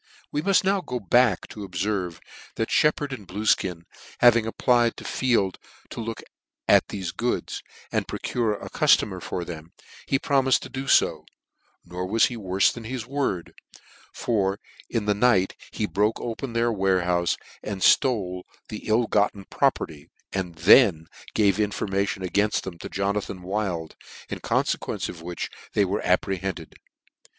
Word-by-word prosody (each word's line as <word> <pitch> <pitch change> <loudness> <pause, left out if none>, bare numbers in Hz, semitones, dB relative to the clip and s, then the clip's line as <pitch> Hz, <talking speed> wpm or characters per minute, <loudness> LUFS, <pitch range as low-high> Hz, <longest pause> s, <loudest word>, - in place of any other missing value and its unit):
We 150 - -1
muft 195 +3 +3
now 195 0 +2
go 125 -7 -4
back 115 0 +3
to - - -10
obferve, 90 -1 -2 0.4
that 110 - -2
Shep 150 -1 +4
pard 145 -2 -4
and 105 -8 -8
Bluefkin 95 -3 0 0.4
having 115 -2 +5
applied 120 0 +2
to - - -9
Field 115 -8 0 0.3
to - - -6
look 115 0 -5 0.4
at - - +5
thefe 95 -4 -5
goods, - - -2 0.3
and - - -1
procure 115 -4 -1
a - - -8
cuftomer 95 -4 +3
for 90 0 -4
them, 80 0 -9 0.3
he 135 - +2
promifed 135 -1 +2
to - - -8
do 135 +1 -5
ib; - - +3 0.6
nor 90 +1 -5
was 110 +4 +4
he 125 - -3
worfe 95 -3 +2
than 115 -2 -9
his 125 -1 -4
word, 125 -10 -2 0.6
for 100 -3 0 0.3
in 115 -3 -1
the 105 - +3
night 100 -3 +3 0.2
ho 110 - +1
broke 105 +2 0
open 120 +2 -5
their 115 0 +2
warehoufe, 90 -4 +1 0.2
and 100 -3 -5
ftole 95 -7 +3 0.3
the 105 - -7
ill 115 +2 +3
gotten 105 -2 +1
property, 75 0 0 0.2
and 90 -3 -3
then 85 0 +6 0.3
gave 105 -1 +3
information 100 -2 -1
againlt 100 +4 +1
them 85 -3 -7
to - - -7
Jona 100 +2 0
than 90 -2 -8
Wild, 90 -4 -3 0.3
in - - -4
coniequence - - -1
of 85 - -8
which 85 +1 -5 0.2
they - - +3
were - - -1
apprehended. 95 -1 -1
105 Hz, 155 wpm, -25 LUFS, 90-115 Hz, 0.6 s, then